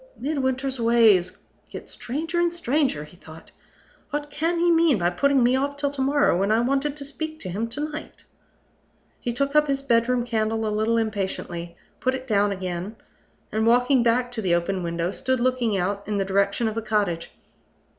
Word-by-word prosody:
"Midwinter's 265 -2 -1
ways 220 -6 +4 0.3
get - - -9
stranger 320 +7 -3
and 345 0 +2
stranger," 285 - 0
he 150 +4 -15
thought. 160 -1 -14 0.6
"What 295 0 -4
can 325 +4 -1
he 345 +1 +3
mean 330 -6 +4
by 175 -1 +1
putting 275 +8 +2
me 245 +2 +4
off 285 +2 -1
till 285 -1 -1
to 285 -1 -4
morrow, 285 -2 +3
when 200 +2 +1
I 220 - +4
wanted 275 +4 0
to 280 - -7
speak 315 +2 -6
to 185 - -6
him 210 +6 -2
to 240 +6 -6
night?" 305 0 -9 1.0
He 240 - -2
took 280 +4 -1
up 300 0 +5
his 275 -1 -1
bedroom 240 -1 +2
candle 225 -1 -1
a 210 - -1
little 220 +2 +1
impatiently, 190 -5 -3 0.2
put 260 0 0
it 260 0 -7
down 205 -4 +2
again, 185 +2 -4 0.6
and, 220 +1 0
walking 245 +2 +4
back 245 +1 +1
to 235 -2 -4
the 180 -4 +2
open 185 +2 -1
window, 170 +1 -2
stood 260 +2 -1
looking 240 -4 +1
out 200 +2 -2
in 210 -1 -1
the 195 - 0
direction 200 +4 +1
of 220 - -2
the 225 - -3
cottage. 205 -6 -1
235 Hz, 190 wpm, -24 LUFS, 200-275 Hz, 1.0 s, up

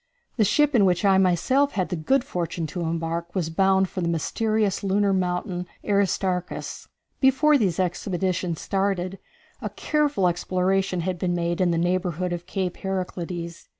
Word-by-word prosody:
The 220 - +4
ship 295 +8 +3
in 225 -5 +5
which 180 0 +2
I, 190 -1 +5
myself, 255 +11 +2
had 185 -3 -1
the 180 - -2
good 245 - +1
fortune 170 -4 -3
to 175 +3 -5
embark, 165 +1 -3
was 165 -4 -1
bound 190 +2 +3
for 185 - -5
the 170 - 0
mysterious 210 +5 0
lunar 200 0 +2
mountain 180 0 -1 0.2
Aristarchus. 190 -3 -1 0.3
Before 280 +3 +4
these 195 - +1
expeditions 180 -1 -1
started, 195 -1 -1 0.4
a - - -3
careful 295 -10 +1
exploration 185 +1 0
had 180 0 -2
been 175 0 0
made 170 +1 -1
in 180 - +3
the 170 - +1
neighborhood 180 0 0
of 175 +1 -6
Cape 185 -2 -2
Heraclides. 180 -3 -4
185 Hz, 155 wpm, -24 LUFS, 175-195 Hz, 0.4 s, in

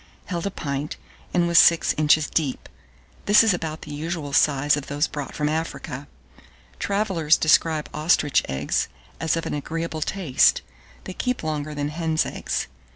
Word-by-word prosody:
held 175 -1 -3
a - - 0
pint, 145 -4 -4 0.3
and 175 -1 +2
was 170 -1 +6
six 170 -1 +5
inches 155 0 +3
deep: 145 -5 -2 0.6
this 205 +2 +7
is 220 -3 +3
about 160 -2 -4
the 150 - -8
usual 155 -1 -4
size 145 0 +3
of 145 -2 -6
those 145 +2 0
brought 145 -2 -6
from 150 - 0
Africa. 150 -3 -4 0.7
Travellers 190 -7 +1
describe 155 -1 +2
ostrich 150 -2 +2
eggs 65 +2 -1 0.3
as 165 0 0
of 165 - -3
an - - -3
agreeable 160 +2 -4
taste: 165 -5 +2 0.4
they 185 - -7
keep 250 +2 -2
longer 150 -1 -3
than 145 0 -2
hen's 160 0 0
eggs. - - -3
155 Hz, 155 wpm, -23 LUFS, 145-170 Hz, 0.7 s, this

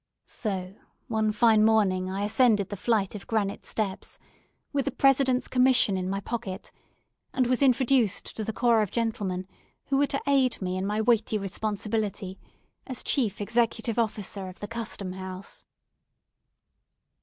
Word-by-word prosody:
So, 190 -4 -4 0.4
one 220 -1 +1
fine 220 0 +4
morning 195 -4 +3
I 195 +1 -2
ascended 210 -2 +3
the 205 - -4
flight 205 -1 0
of 210 - -8
granite 205 -3 -1
steps, 200 -4 -3 0.6
with 275 -2 0
the 280 - 0
President's 265 -1 +3
commission 250 -5 +4
in 185 0 -2
my 195 +1 -1
pocket, 195 -2 -5 0.6
and 255 - +3
was 250 +2 +1
introduced 255 -5 +2
to 220 - -3
the 220 - -2
corps 235 0 +3
of 210 - -1
gentlemen 205 -6 -2 0.4
who 270 - +2
were 285 +1 +3
to 275 - -1
aid 270 -3 +2
me 185 -1 -2
in 190 +1 -2
my 210 +1 0
weighty 220 -1 +2
responsibility 205 -1 -3 0.5
as 255 -3 -3
chief 220 -7 +1
executive 230 +2 0
officer 205 -3 -2
of 185 - -11
the 205 - -5
Custom 220 -4 -4
House. 185 0 -8
215 Hz, 150 wpm, -27 LUFS, 195-240 Hz, 0.6 s, fine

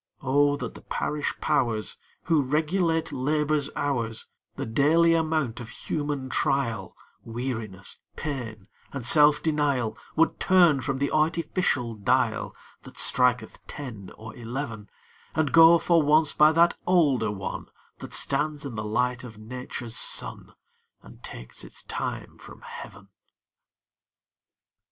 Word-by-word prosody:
Oh 145 +2 +3
that - - -5
the - - -12
Parish 150 -1 -2
Powers, 110 -4 0 0.3
Who 160 -3 +3
regulate 160 +4 0
Labor's 150 +2 0
hours, 120 -6 -1 0.3
The - - -4
daily 155 +8 +3
amount 155 -7 0
of 115 -2 -8
human 145 +1 -3
trial, 115 -8 -1 0.3
Weariness, 115 -5 -4 0.2
pain, 115 -9 -5 0.2
and 135 -4 -5
self 150 +3 +5
denial, 140 -8 0 0.2
Would 165 +1 +2
turn 175 -7 +4
from 135 0 -2
the 140 +1 -1
artificial 155 -5 0
dial 115 +1 0 0.3
That - - -13
striketh 125 -3 +2
ten 110 -10 -8
or 110 0 -10
eleven, 115 -3 -6 0.5
And 155 -2 +1
go, 165 +1 +8
for 170 0 +3
once, 150 +1 +4
by 150 +1 +6
that 170 +2 +4
older 145 - +3
one 95 -2 -5 0.3
That - - -5
stands 145 +1 0
in 135 - -5
the 110 -1 -4
light 125 +4 -1
of 115 -4 -10
Nature's 120 +1 -7
sun, - - -1 0.5
And - - -15
takes - - -8
its - - -10
time - - -5
from - - -13
Heaven! 95 0 -10
135 Hz, 130 wpm, -26 LUFS, 115-155 Hz, 0.5 s, go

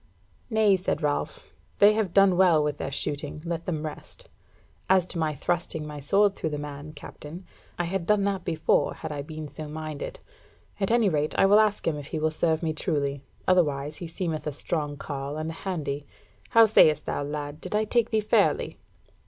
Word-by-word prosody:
"Nay," 220 -3 +4
said 180 -4 -2
Ralph, 145 -1 -2 0.2
"they 205 +1 +7
have 215 -4 0
done 195 0 +5
well 175 -4 +5
with 150 -1 -1
their 135 - -4
shooting, 145 +1 -4
let 170 -1 -4
them 160 -3 -2
rest. 150 - -9 0.6
As 190 -2 +5
to 180 - -5
my 155 -2 0
thrusting 160 0 -2
my 150 -1 -7
sword 195 +8 +3
through 160 - -2
the 150 - -3
man, 145 +1 -7
Captain, 155 +4 -10 0.3
I 175 - 0
had 175 0 -3
done 210 -1 +3
that 195 -2 -1
before, 160 -2 +1
had 160 - -6
I 145 -1 -3
been 155 +1 -7
so 155 +1 -7
minded. 155 -1 -6 0.6
At 195 - 0
any 230 -2 +4
rate, 155 -4 0
I - - +5
will 205 +2 +6
ask 215 -1 +2
him 155 -2 +1
if 145 -1 -7
he - - -4
will 155 +1 +1
serve 160 +1 0
me 160 -1 0
truly. 145 -4 -1 0.3
Otherwise 150 -5 +2
he 175 - -6
seemeth 165 -2 -3
a 150 - -2
strong 145 0 -2
carle 140 0 -5
and 155 +1 -3
a - - -7
handy. 150 -6 -4 0.4
How 230 0 +7
sayest 155 -8 +5
thou, - - -2
lad, 145 +1 -5
did - - -4
I 215 +1 +2
take 235 +1 +1
thee 220 -2 +1
fairly?" 210 - +1
160 Hz, 200 wpm, -26 LUFS, 150-190 Hz, 0.6 s, they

